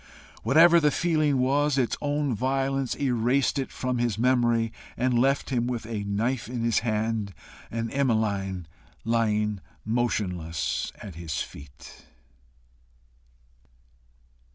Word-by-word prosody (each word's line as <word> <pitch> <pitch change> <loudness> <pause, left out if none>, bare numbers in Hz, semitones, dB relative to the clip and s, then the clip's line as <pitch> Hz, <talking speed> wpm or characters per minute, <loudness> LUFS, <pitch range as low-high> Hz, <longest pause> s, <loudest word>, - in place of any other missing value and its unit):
Whatever 165 +8 +6
the 150 -2 +3
feeling 155 -2 +1
was, 140 +2 +2
its 125 -3 +1
own 145 -2 0
violence 135 +2 0
erased 130 +2 +1
it 135 - -3
from 125 -1 -2
his 120 -4 0
memory, 120 -2 +2 0.2
and 125 -1 +2
left 135 +2 +1
him 120 -2 +1
with 120 -3 -3
a 110 -2 -4
knife 110 +4 -1
in 120 -2 -3
his 115 -2 +2
hand, 110 -2 -1 0.3
and 115 0 -3
Emmeline 105 -9 0 0.4
lying 105 -3 +1 0.3
motionless 95 -8 -1
at 100 - -8
his 80 -2 -3
feet. 70 +2 -13
120 Hz, 115 wpm, -26 LUFS, 105-135 Hz, 0.4 s, Whatever